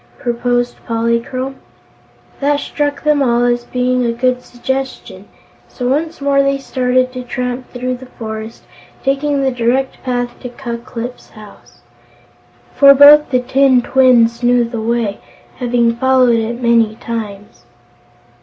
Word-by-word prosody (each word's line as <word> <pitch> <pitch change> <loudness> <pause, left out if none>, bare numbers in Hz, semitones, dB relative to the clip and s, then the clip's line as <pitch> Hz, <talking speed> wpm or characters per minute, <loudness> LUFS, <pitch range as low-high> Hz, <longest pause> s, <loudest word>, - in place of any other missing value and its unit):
proposed 245 0 -2
Polychrome. 235 +3 -2 0.8
That 285 +1 +1
struck 290 0 -3
them 300 -2 +2
all 240 -2 +2
as 240 0 0
being 250 0 0
a 235 - 0
good 250 +1 0
suggestion, 250 -6 -5 0.4
so 245 - -5
once 310 +5 -1
more 280 0 +2
they 275 0 +1
started 255 -1 0
to 255 - -5
tramp 250 0 -4
through 250 0 -3
the 260 +1 -12
forest, 220 -2 -8 0.4
taking 275 +1 0
the 265 - +1
direct 250 +2 -1
path 245 -1 -3
to 250 - -7
Ku 240 -2 -6
Klip's 240 +1 -8
house, 205 - -16 0.9
for 275 0 +7
both 295 +2 +7
the 255 -2 +1
tin 260 0 +3
twins 240 -3 +3
knew 245 0 +3
the 230 -1 -5
way, 225 -2 -1 0.4
having 235 -2 +1
followed 255 -2 +3
it 230 +2 -3
many 230 -3 +2
times. 210 - -7
250 Hz, 135 wpm, -16 LUFS, 235-265 Hz, 0.9 s, for